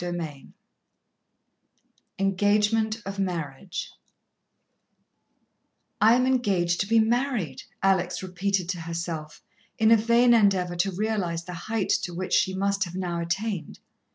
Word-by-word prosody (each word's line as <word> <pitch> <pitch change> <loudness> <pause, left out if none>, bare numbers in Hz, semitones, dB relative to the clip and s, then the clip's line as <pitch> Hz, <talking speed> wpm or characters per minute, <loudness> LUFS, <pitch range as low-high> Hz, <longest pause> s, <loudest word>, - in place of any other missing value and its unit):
XI 165 -5 -5 1.7
Engagement 210 +3 +1
of 195 0 -5
Marriage 175 -2 -4 2.1
"I 220 +3 +7
am 255 +1 +2
engaged 195 -10 +1
to 195 - 0
be 225 +1 +3
married," 225 - 0 0.2
Alex 190 -1 +1
repeated 185 0 -1
to 180 -3 -3
herself, 165 -2 -5 0.3
in 220 0 +4
a 230 - +8
vain 235 +2 +4
endeavour 195 -5 +3
to 195 +3 +1
realize 185 -4 -2
the 180 - -7
height 205 +4 -3
to 175 - -5
which 185 +1 -4
she 190 - +2
must 200 0 0
have 175 0 -9
now 175 -2 -2
attained. 175 0 -3
190 Hz, 125 wpm, -26 LUFS, 175-215 Hz, 2.1 s, a